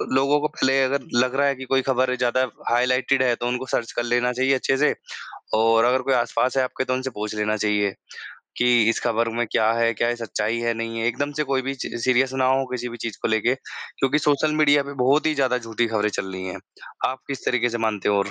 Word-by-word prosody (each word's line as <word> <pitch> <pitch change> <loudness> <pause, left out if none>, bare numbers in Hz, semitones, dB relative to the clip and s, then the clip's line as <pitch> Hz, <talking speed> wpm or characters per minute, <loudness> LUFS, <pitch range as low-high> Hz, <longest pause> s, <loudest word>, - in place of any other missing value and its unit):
लोगों 140 +2 +3
को 150 - +1
पहले 135 -3 +1
अगर 135 0 -1
लग 125 +1 +2
रहा 140 +1 +3
है 140 - +1
कि 130 0 -8
कोई 135 +1 +2
ख़बर 130 0 +1
ज़्यादा 125 +1 +1 0.3
हाइलाइटेड 125 +2 +2
है 125 -1 +3
तो 120 - -4
उनको 125 +1 -2
सर्च 115 - -1
कर 120 - 0
लेना 120 +1 +1
चाहिए 130 +2 +2
अच्छे 135 +1 0
से 150 +2 +3 0.6
और 115 +1 +4
अगर 130 +1 +2
कोई 135 +1 0
आसपास 125 +1 0
है 130 - +3
आपके 130 0 -2
तो 130 - -1
उनसे 130 +1 -2
पूछ 105 +1 -4
लेना 105 0 0
चाहिए, 105 -1 +1 0.7
कि 120 -1 +4
इस - - -2
ख़बर 115 -1 +1
में 120 - +1
क्या 110 0 +3
है, 115 0 +2
क्या 120 - 0
ये 120 - -1
सच्चाई 115 -1 -2
है, 115 0 0
नहीं 115 0 -4
है। 115 - 0
एकदम 145 +5 -2
से - - +2
कोई 130 -1 +1
भी 135 +1 -3
च 130 - -6
सीरियस 130 +1 +2
ना 130 -1 +1
हो 135 +1 +2
किसी 125 -1 -3
भी 120 - -8
चीज़ 115 - -6
को - - +1
लेके 110 +3 +2
क्योंकि 135 +1 -3
सोशल 150 +1 +1
मीडिया 145 -1 +5
पर 140 0 -8
बहुत 140 +5 +3
ही 155 - +2
ज़्यादा 130 -3 +1
झूठी 115 0 -2
ख़बरें 105 -2 0
चल 95 -2 -4
रही 95 0 -5
हैं। 90 - -6 0.5
आप 130 - -4
किस 135 -3 -5
तरीक़े 120 -1 +2
से 115 - -3
मानते 105 -3 -2
हो 105 - +3
और 100 0 -1
125 Hz, 250 wpm, -23 LUFS, 115-135 Hz, 0.7 s, मीडिया